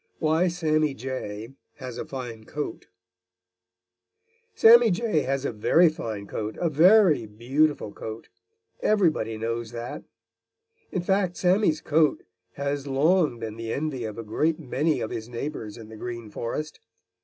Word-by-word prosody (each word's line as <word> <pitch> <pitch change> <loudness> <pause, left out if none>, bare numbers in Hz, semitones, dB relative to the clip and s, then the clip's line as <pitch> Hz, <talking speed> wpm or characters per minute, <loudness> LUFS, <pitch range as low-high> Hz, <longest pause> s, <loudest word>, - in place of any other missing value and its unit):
VI - - -2
WHY 160 +4 +3
SAMMY 155 -4 +1
JAY 115 -2 -6 0.2
HAS 125 -2 -7
A - - -4
FINE 120 -5 -7
COAT 150 +5 -5 1.7
Sammy 235 +1 +8
Jay 210 -2 +1
has 135 0 -2
a - - 0
very 160 +10 +4
fine 110 -9 -5
coat, 105 +1 -5
a 170 -2 0
very 170 - +5
beautiful 125 +2 0
coat. 110 0 -7 0.5
Everybody 160 - +2
knows 115 +1 -3
that. 120 +1 -6 0.9
In 185 - -2
fact, 190 -1 +1
Sammy's 185 -2 +2
coat 155 -1 +2 0.3
has 140 0 -3
long 150 +1 +2
been 110 -1 -6
the 115 0 -4
envy 140 -3 -2
of 110 0 -6
a 115 - -5
great 155 +9 0
many 155 +2 0
of 110 - -3
his 110 +1 -5
neighbors 120 -3 -5
in 110 -2 -11
the 110 - -10
Green 115 -2 -6
Forest. 150 +8 -4
140 Hz, 145 wpm, -26 LUFS, 115-160 Hz, 1.7 s, Sammy